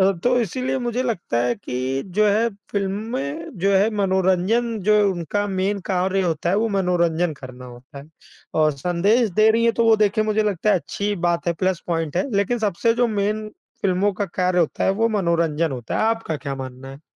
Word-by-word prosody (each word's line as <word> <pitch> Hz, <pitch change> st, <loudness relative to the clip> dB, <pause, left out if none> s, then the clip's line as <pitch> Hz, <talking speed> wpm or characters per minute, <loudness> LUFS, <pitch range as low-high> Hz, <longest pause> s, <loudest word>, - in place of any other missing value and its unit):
अ, 190 Hz, +1 st, +5 dB
तो 245 Hz, 0 st, +3 dB
इसीलिए 255 Hz, +5 st, -2 dB
मुझे 245 Hz, 0 st, -2 dB
लगता 215 Hz, -, -2 dB
है 120 Hz, 0 st, +1 dB
कि 130 Hz, +3 st, -3 dB
जो 215 Hz, 0 st, +4 dB
है 220 Hz, +3 st, +2 dB, 0.2 s
फ़िल्में 195 Hz, -, -3 dB
जो 195 Hz, +1 st, +2 dB
है 200 Hz, +3 st, +4 dB
मनोरंजन 195 Hz, +4 st, +1 dB
जो 210 Hz, +3 st, +3 dB, 0.2 s
उनका 190 Hz, +4 st, -2 dB
मेन 195 Hz, +1 st, -1 dB
कार्य 190 Hz, +1 st, +1 dB
होता 170 Hz, -1 st, -1 dB
है 195 Hz, -, +2 dB
वो 225 Hz, +2 st, +1 dB
मनोरंजन 175 Hz, -4 st, +1 dB
करना 130 Hz, -2 st, -11 dB
होता 125 Hz, +3 st, -12 dB
है 140 Hz, +2 st, -12 dB, 0.5 s
और 155 Hz, -1 st, +3 dB
संदेश 200 Hz, -, +2 dB
दे 215 Hz, +4 st, +4 dB
रही 230 Hz, +1 st, +2 dB
हैं 230 Hz, -, +4 dB
तो 230 Hz, -, +2 dB
वो 225 Hz, -1 st, +5 dB
देखिए 215 Hz, 0 st, +2 dB
मुझे 215 Hz, 0 st, +1 dB
लगता 205 Hz, -1 st, -1 dB
है 205 Hz, -, +5 dB
अच्छी 190 Hz, +3 st, -5 dB
ही 205 Hz, -, 0 dB
बात 170 Hz, 0 st, -1 dB
है -, -, +2 dB
प्लस 185 Hz, +1 st, -1 dB
पॉइंट 165 Hz, -2 st, -2 dB
है, 190 Hz, +10 st, 0 dB
लेकिन 200 Hz, +5 st, +1 dB
सबसे 220 Hz, +2 st, +1 dB
जो 245 Hz, 0 st, +2 dB
मेन 215 Hz, 0 st, -1 dB, 0.3 s
फ़िल्मों 195 Hz, +1 st, +1 dB
का 205 Hz, -, -1 dB
कार्य 180 Hz, +1 st, 0 dB
होता 160 Hz, -, 0 dB
है -, -, +3 dB
वो 225 Hz, +3 st, +1 dB
मनोरंजन 170 Hz, -6 st, 0 dB
होता 120 Hz, -3 st, -4 dB
है। -, -, +1 dB
आपका 225 Hz, -9 st, -5 dB
क्या 140 Hz, -2 st, -4 dB
मानना 130 Hz, 0 st, -8 dB
है? 135 Hz, +1 st, -12 dB
190 Hz, 205 wpm, -22 LUFS, 165-215 Hz, 0.5 s, अ